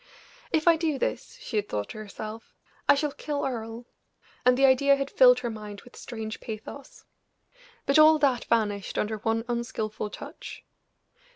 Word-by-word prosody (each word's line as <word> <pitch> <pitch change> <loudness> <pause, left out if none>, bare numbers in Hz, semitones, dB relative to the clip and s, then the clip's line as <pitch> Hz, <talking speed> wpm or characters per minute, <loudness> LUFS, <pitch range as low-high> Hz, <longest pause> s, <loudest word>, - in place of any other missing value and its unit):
"If 320 +1 +1
I 335 -1 +7
do 315 -3 0
this," 475 - -3
she 230 - -4
had 205 0 -1
thought 105 -1 -3
to - - -8
herself, 215 +1 -8 0.3
"I - - +8
shall 295 +1 -1
kill 290 0 -3
Earle," 230 -2 -5 0.6
and 250 0 +4
the 275 - +5
idea 275 +1 +5
had 275 0 -3
filled 250 -1 +6
her 240 - -2
mind 210 -2 -8
with 245 - -17
strange 220 -2 -6
pathos. 230 +5 -9 0.8
But 275 +2 +4
all 310 0 +8
that 270 -5 +1
vanished 210 -4 0
under 215 +1 -1
one 225 +2 -1
unskillful 230 -3 -3
touch. - - -9
240 Hz, 165 wpm, -27 LUFS, 215-275 Hz, 0.8 s, I